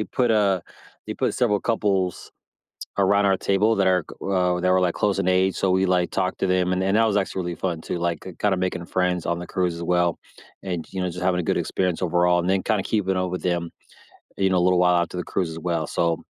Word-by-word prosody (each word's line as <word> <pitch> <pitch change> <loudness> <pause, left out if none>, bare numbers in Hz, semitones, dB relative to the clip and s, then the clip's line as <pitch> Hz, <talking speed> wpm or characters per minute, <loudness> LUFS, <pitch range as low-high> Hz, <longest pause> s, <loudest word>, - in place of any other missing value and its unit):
they - - -1
put, 120 +1 0
uh 100 -4 +2 0.5
they - - -4
put - - -1
several 105 -5 +1
couples 100 -5 -1 0.7
around 100 +1 +3
our 95 -1 +3
table 105 +3 +2
that 100 -1 +2
are 90 -2 +3
g - - -13
uh, 90 -2 +1
that 90 +1 +1
were, 95 0 +4
like, 90 -2 +1
close 100 -2 0
in - - 0
age, 95 +1 +2
so 95 - +1
we, 95 +1 +2
like, 90 -1 +1
talked 95 -1 -1
to 95 - +1
them, 90 0 +1
and 90 0 0
and 95 +2 +2
that 115 0 +4
was 105 - +1
actually 95 -1 -1
really 85 0 -4
fun 85 -4 -3
too, 85 - -4
like, 85 -2 -1
k 95 - -8
kinda 100 -2 +1
making 90 -1 -2
friends 90 -2 0
on 85 0 -1
the 90 - -7
cruise 90 -2 -1
as 85 - -6
well 90 0 +1 0.4
and, 90 -4 -4
you 95 - -3
know, 90 - -1
just 90 +1 -6
having 90 -1 +2
a - - -2
good - - 0
experience 90 -2 -1
overall, 90 0 +2
and 90 - -1
then 95 0 +1
kinda 105 -3 0
keeping 95 -3 0
up 90 0 -1
with 90 - -4
them, 85 -2 -1 0.7
you 95 - +3
know, 95 - +2
a - - +2
little 90 -1 +3
while 90 -1 +4
after 85 - -5
the 90 - -3
cruise 90 -3 -2
as 80 - -7
well. 85 -2 -1
So, 85 +1 -1
90 Hz, 260 wpm, -23 LUFS, 90-95 Hz, 0.7 s, were